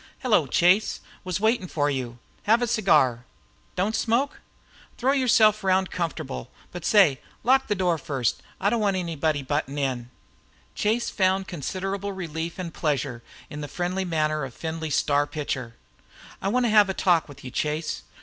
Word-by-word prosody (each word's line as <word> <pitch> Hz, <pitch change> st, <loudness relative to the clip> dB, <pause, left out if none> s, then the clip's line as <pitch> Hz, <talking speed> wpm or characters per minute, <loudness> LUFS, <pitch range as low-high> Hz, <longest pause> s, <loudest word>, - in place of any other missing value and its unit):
"Hello, 210 Hz, -, +3 dB
Chase; 180 Hz, +9 st, +3 dB, 0.2 s
was 185 Hz, -1 st, -2 dB
waiting 220 Hz, -2 st, +1 dB
for 145 Hz, -4 st, 0 dB
you. 130 Hz, -4 st, -3 dB, 0.3 s
Have 230 Hz, +3 st, +4 dB
a -, -, +3 dB
cigar. 150 Hz, -, +3 dB, 0.5 s
Don't 200 Hz, +4 st, 0 dB
smoke? 240 Hz, +6 st, 0 dB, 0.6 s
Throw 260 Hz, +3 st, +2 dB
yourself 225 Hz, -6 st, +4 dB
round 190 Hz, 0 st, +2 dB
comfortable 155 Hz, -, -4 dB, 0.2 s
but 175 Hz, -2 st, -7 dB
say, 190 Hz, -12 st, +5 dB, 0.2 s
lock 265 Hz, +3 st, +4 dB
the 210 Hz, -, +1 dB
door 175 Hz, -3 st, +1 dB
first. 135 Hz, -4 st, -1 dB, 0.2 s
I 200 Hz, +2 st, +2 dB
don't 235 Hz, -, +1 dB
want 200 Hz, -2 st, +2 dB
any 170 Hz, -3 st, -3 dB
one 150 Hz, -1 st, 0 dB
butting 145 Hz, 0 st, -2 dB
in." 130 Hz, -4 st, -2 dB, 0.6 s
Chase 225 Hz, +3 st, 0 dB
found 190 Hz, -1 st, +1 dB
considerable 195 Hz, +4 st, -4 dB
relief 165 Hz, -2 st, -5 dB
and 175 Hz, -3 st, -5 dB
pleasure 140 Hz, -6 st, -1 dB, 0.3 s
in 150 Hz, -, -7 dB
the 145 Hz, -, -4 dB
friendly 180 Hz, +4 st, -2 dB
manner 155 Hz, -3 st, 0 dB
of 130 Hz, -3 st, -7 dB
Findlay's 160 Hz, -2 st, -3 dB
star 145 Hz, 0 st, +2 dB
pitcher. 130 Hz, -6 st, -4 dB, 0.7 s
"I -, -, -1 dB
want 245 Hz, +4 st, +2 dB
to 230 Hz, -, +2 dB
have 210 Hz, -2 st, +6 dB
a 195 Hz, -, -2 dB
talk 170 Hz, -4 st, +2 dB
with 140 Hz, -1 st, -12 dB
you, 125 Hz, -, -7 dB
Chase. 155 Hz, +3 st, -2 dB
175 Hz, 170 wpm, -25 LUFS, 145-200 Hz, 0.7 s, have